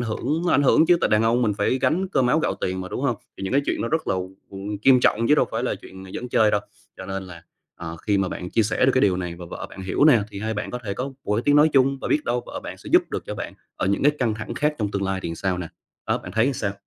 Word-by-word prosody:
hưởng 130 +8 -2
ảnh 145 - +4
hưởng 150 +4 +5
chứ, 175 - +6
tại - - +2
đàn 105 +1 +4
ông 115 +2 +2
mình 110 -3 +2
phải 115 +5 +1
gánh 180 +8 +1
cơm 135 -9 +2
áo 150 +6 +3
gạo - - 0
tiền 95 0 -2
mà, 95 - -6
đúng - - -4
hông? 125 -5 +1 0.2
Thì - - -9
những 95 - -3
cái 140 +2 +3
chuyện - - -1
nó 115 - -1
rất 160 +4 -1
là, - - +2 0.4
ừm, 100 +2 -5
nghiêm 130 -2 +7
trọng 115 -1 +2
chứ 150 - +6
đâu - - +3
phải 115 +1 -2
là 125 - 0
chuyện 95 0 -12
giỡn 125 - -5
chơi 110 -3 +4
đâu. 105 - +2 0.4
Cho 95 - -8
nên 95 0 -4
là, 85 -3 -11 0.3
à, 85 - -8 0.2
khi 100 -2 +3
mà 95 -1 +1
bạn 90 0 -6
chia 115 - +3
sẻ 110 +4 +1
được 135 - +4
cái 130 - +4
điều 95 -5 +3
này 90 -2 -4
và 90 - -8
vợ - - -6
bạn 95 - -9
hiểu 95 +9 +1
nè 130 -8 +6
thì 100 - -7
hai 110 +1 -2
bạn 105 - -4
có 125 - -4
thể 100 -2 -3
có 125 - -3 0.2
một 105 - 0
cái 115 - 0
tiếng 145 0 +4
nói 150 +2 +6
chung 135 0 +3
và - - -3
biết 150 - +1
đâu 120 +1 -1
vợ - - -6
bạn - - -7
sẽ - - -10
giúp - - +7
được - - -4
cho - - -4
bạn - - -6 0.2
ở - - -1
những 100 +1 0
cái 145 +2 +5
căng 115 -4 +1
thẳng 110 +2 -6
khác 150 +4 0
trong 105 -3 -1
tương 100 -1 -2
lai 95 0 -1
thì 85 - -3
sao 90 +2 -2
nè. 85 -2 -5 0.4
Đó, - - +1
bạn - - -9
thấy 110 +6 +2
sao? 100 -6 -2
110 Hz, 320 wpm, -23 LUFS, 95-130 Hz, 0.4 s, nghiêm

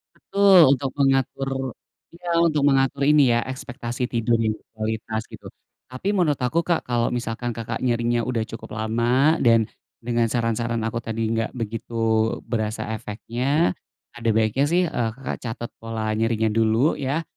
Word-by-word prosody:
Betul, 195 -7 +5
untuk 135 0 -3
mengatur 135 -1 +1 0.6
iya, 175 0 -5
untuk 155 -4 +2
mengatur 135 0 +2
ini 145 -4 +5
ya 120 - +3
ekspektasi 125 -1 -4
tidur 115 -1 +1
yang 110 -1 +1
berkualitas 110 0 -4
gitu. - - -11 0.4
Tapi 130 +11 -3
menurut 175 -7 +2
aku, 145 +7 +1
Kak, 170 -2 +1
kalo 120 -1 0
misalkan, 120 0 -3
Kakak, 115 0 -4
nyerinya 120 -1 +1
udah 120 -3 0
cukup 110 -1 -9
lama 120 +8 +2
dan 115 -2 +4 0.4
dengan 120 -1 +1
saran-saran 115 -1 -1
aku 115 +1 -2
tadi 115 -1 -3
nggak 115 0 -1
begitu 115 -1 -1
berasa 110 -1 -3
efeknya, 120 +9 -1 0.4
ada 120 -1 -2
baiknya 110 +5 +2
sih, 175 +3 +2
eee, 115 -6 -1
Kakak, 135 - -5
catat 120 0 -5
pola 110 -1 -3
nyerinya 110 0 +1
dulu 115 +6 +2
ya. 140 +5 -1
120 Hz, 150 wpm, -23 LUFS, 115-135 Hz, 0.6 s, Betul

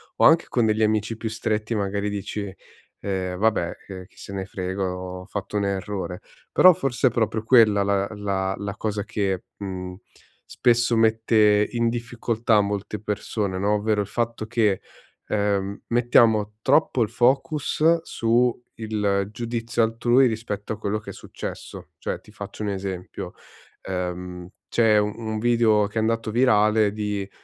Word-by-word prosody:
o - - +3
anche 165 +1 +6
con 120 -3 +2
degli 110 0 +1
amici 110 +1 +1
più 110 0 -4
stretti 110 0 -2
magari 100 0 -1
dici: 100 0 -4 0.5
"Ehm 95 -2 -2
vabbè, 105 -5 +1 0.2
ehm, 95 -2 -8
chi - - -29
se 100 - -9
ne 95 -1 -3
frega, 95 +1 -4
ho 90 0 -7
fatto 100 +1 -4
un 100 - 0
errore", 95 -2 -3 0.3
però 185 -1 +7
forse 130 -2 +1
è - - -9
proprio 110 -1 0
quella 110 -4 +5
la 100 0 +1
la 95 -2 -1
la 100 -1 -5
cosa 105 -2 -2
che, 100 -3 -2
mhmm, 90 -2 -6 0.6
spesso 120 -1 +2
mette 110 -2 +4
in 115 -1 +1
difficoltà 115 -1 0
molte 100 0 -3
persone, 105 -2 -3
no, 100 +2 +1
ovvero 105 0 +1
il 100 - -4
fatto 115 0 -2
che, 110 -4 +1 0.5
ehm, 100 -1 -1
mettiamo 115 -3 +3
troppo 135 -3 +3
il 105 - -2
focus 150 +6 +2
su 120 -2 +2 0.3
il 105 -3 -1
giudizio 115 0 -1
altrui 120 +3 +3
rispetto 110 -3 -3
a - - -7
quello 105 0 -1
che 110 - -8
è - - -10
successo. - - -8
Cioè - - -3
ti 105 - -18
faccio 100 +1 -8
un 105 - -1
esempio, 95 -2 -5 0.5
ehm, 90 -1 -5 0.2
c'è 110 -2 +3
un 110 +1 -1
video 115 -2 +3
che 110 +2 -3
è - - +1
andato 115 0 0
virale 110 -3 +3
di, 105 -2 -3
105 Hz, 155 wpm, -24 LUFS, 100-115 Hz, 0.6 s, però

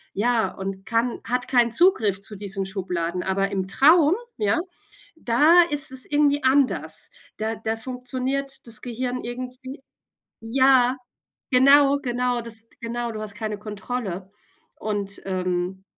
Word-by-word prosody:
ja 230 +2 +1
und 195 0 -6
kann 230 +1 0
hat 245 +1 -2
keinen 240 -3 +3
Zugriff 225 - +3
zu 210 +1 -6
diesen 195 -1 -4
Schubladen. 180 -2 -3
Aber, 195 +1 0
im 190 -2 -2
Traum, 305 - +5 0.2
ja, 210 +7 +1 0.6
da 315 +6 +5
ist 290 -2 0
es 260 -1 0
irgendwie 290 -1 +2
anders. 265 0 +2 0.3
Da 220 +1 -2
da 220 0 -3
funktioniert 260 +3 -4
das 230 -1 -3
Gehirn 250 +1 -4
irgendwie 255 +3 -7 0.6
ja, 255 +2 +4 0.6
genau. 275 +2 +6
Genau, 245 -2 -1
das 225 -1 -9
genau, 235 0 -3
du 215 -1 -6
hast 210 -1 -7
keine 215 -2 -4
Kontrolle 205 -3 -5 0.5
und, 205 -2 -3
ähm, 185 0 -2
235 Hz, 130 wpm, -24 LUFS, 200-260 Hz, 0.6 s, genau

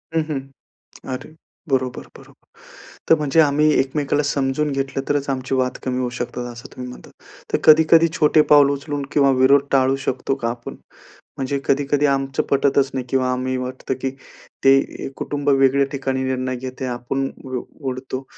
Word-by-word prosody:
हं, 165 - +3
हं. 145 -3 -1 0.7
अरे 130 +4 -7 0.3
बरोबर, 130 -2 -1 0.2
बरोबर. - - -19 0.6
तर - - +9
म्हणजे 150 +1 +2
आम्ही 150 0 +3
एकमेकाला 145 +2 0
समजून 140 +1 0
घेतलं, 135 0 -2
तरच 145 -1 0
आमची 130 -1 -2
वाद 130 -1 0
कमी 125 -1 -2
होऊ 125 - -1
शकतात 120 0 -4
असं 120 +1 -11
तुम्ही 125 0 -7
म्हणतात. - - -13 0.4
तर - - +2
कधी-कधी 160 +1 +6
छोटे 155 0 +4
पाऊल 145 -2 +7
उचलून 145 +1 -3
किंवा 140 -2 +4
विरोध 140 +2 +5
टाळू 135 0 +3
शकतो 130 +1 -1
का 115 - +1
आपण? 120 0 -7 0.6
म्हणजे 135 +1 -2
कधी-कधी 145 +1 +1
आमचं 135 -1 0
पटतच 140 0 +2
नाही 130 -2 -3
किंवा 130 -1 +1
आम्ही 130 0 -2
वाटतं, 130 +1 -4
की 135 - -1 0.5
ते 135 0 +7 0.3
ए, - - -3
कुटुंब 145 0 -2
वेगळ्या 135 0 +4
ठिकाणी 135 -1 -2
निर्णय 130 -1 -2
घेते 130 +1 -6
आपण 130 +2 -2 0.2
उ 130 -2 -3 0.3
उडतो. 130 +1 -5
135 Hz, 165 wpm, -21 LUFS, 130-145 Hz, 0.7 s, तर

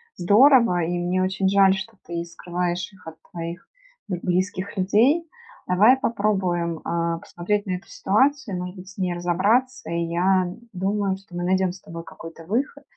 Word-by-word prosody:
здорово, 225 0 +5
и 175 +2 -1
мне 180 +1 0
очень 190 +1 0
жаль, 195 -1 +5
что 195 +4 -6
ты 170 0 -4
скрываешь 175 +2 -3
их 185 - -19
от 160 - -8 0.2
твоих 170 +1 -6 0.4
б 180 -3 -3
близких 185 +2 -1
людей. 245 - +3 0.4
Давай 210 +8 +5
попробуем, 190 -8 0
э, 170 0 -2
посмотреть 205 +6 -2
на 185 - -3
эту - - -16
ситуацию, 250 0 +1
может 180 +1 -5
быть, 185 0 -11
с 195 - -15
ней 180 -1 0
разобраться. 200 +9 +1
И 170 0 -1
я 180 +2 +1 0.2
думаю, 195 +1 -1
что 190 -2 -15
мы 175 - -3
найдем 185 0 +2
с 185 - -12
тобой 165 0 -8
какой-то 165 0 -11
выход. 265 - -2
185 Hz, 165 wpm, -23 LUFS, 175-205 Hz, 0.4 s, здорово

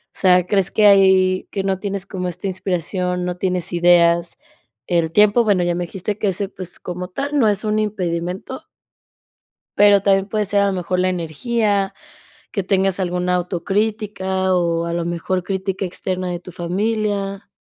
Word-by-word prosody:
o - - -12
sea, 180 -2 +4
crees 195 -1 +1
que 215 - +3
ahí 190 -1 +4
que 195 - -2
no 190 -1 -1
tienes 200 -1 -4
como 185 -2 -4
esta 180 +2 -6
inspiración, 180 -1 -2
no 180 0 -3
tienes 180 -1 -2
ideas, 170 0 +3 0.5
el 170 -2 +1
tiempo, 210 +5 +4
bueno 200 -5 +2
ya 175 0 0
me 175 0 -2
dijiste 195 +4 -4
que 210 - -1
ese 195 +1 -3
pues, 185 -3 -9
como 180 0 -6
tal 285 +9 -3
no 230 - +4
es 205 0 0
un 215 0 0
impedimento. 185 +1 -3 1.1
Pero 205 -1 +6
también 195 -1 +3
puede 210 0 -1
ser 200 +1 +1
a - - +3
lo 195 - 0
mejor 180 0 -2
la 185 0 +2
energía, 195 - -1 0.6
que 200 - -1
tengas 195 0 +1
alguna 180 0 0
autocrítica, 190 +1 -1
o 170 -1 0
a 170 - -3
lo 170 0 -1
mejor 175 +2 -2
crítica 190 +1 -3
externa 185 0 -3
de 175 - -3
tu 180 +1 -12
familia. 200 +2 -2
190 Hz, 175 wpm, -20 LUFS, 180-200 Hz, 1.1 s, Pero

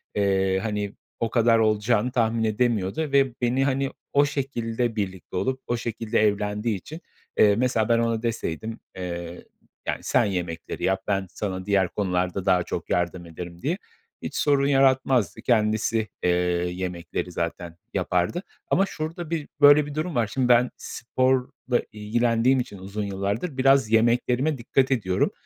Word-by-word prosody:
eee, 95 -2 +2
hani 105 -2 -2 0.3
o 115 - 0
kadar 115 0 +4
olacağını 110 +2 +2
tahmin 115 -2 +1
edemiyordu. 110 0 0
Ve 135 -2 +3
beni, 125 +2 +2
hani, 135 0 0 0.2
o 145 +1 +5
şekilde 120 -4 -2
birlikte 95 -3 -4
olup 130 +6 -1
o 120 - 0
şekilde 115 -1 -2
evlendiği 105 +1 0
için. 155 - -10 0.4
Eee, 105 -1 +6
mesela 115 -2 +1
ben 115 0 +4
ona 115 -1 0
deseydim, 115 -1 -3 0.2
eee, 85 -1 -5 0.4
yani, - - -1
"Sen - - +3
yemekleri 90 -4 -4
yap, 95 0 +1
ben 95 -2 0
sana 95 -2 -4
diğer 95 -3 +2
konularda 90 -1 -1
daha 90 -2 +3
çok - - -5
yardım 90 0 -1
ederim." 85 +1 -9
diye. 165 +6 -1 0.4
Hiç - - -6
sorun 140 -2 +2
yaratmazdı. 130 -5 +3
Kendisi, 110 -1 +1 0.2
eee, 90 - +3 0.4
yemekleri 90 -1 -4
zaten 85 0 -4 0.2
yapardı 90 - 0 0.2
ama 195 - +3
şurada 165 -2 -5
bir, 160 -3 -2
böyle 145 +1 +8
bir 145 -1 -8
durum 155 +1 -2
var. 115 -3 +2
Şimdi 130 -2 +1
ben 125 +1 +5
sporla 130 0 -1
ilgilendiğim 115 +4 +2
için 120 -5 -5
uzun 100 +3 -5
yıllardır 100 - -3
biraz 135 -3 +4
yemeklerime 120 +5 +2
dikkat 130 +2 +1
ediyorum. 95 -8 +1
115 Hz, 150 wpm, -25 LUFS, 95-130 Hz, 0.4 s, böyle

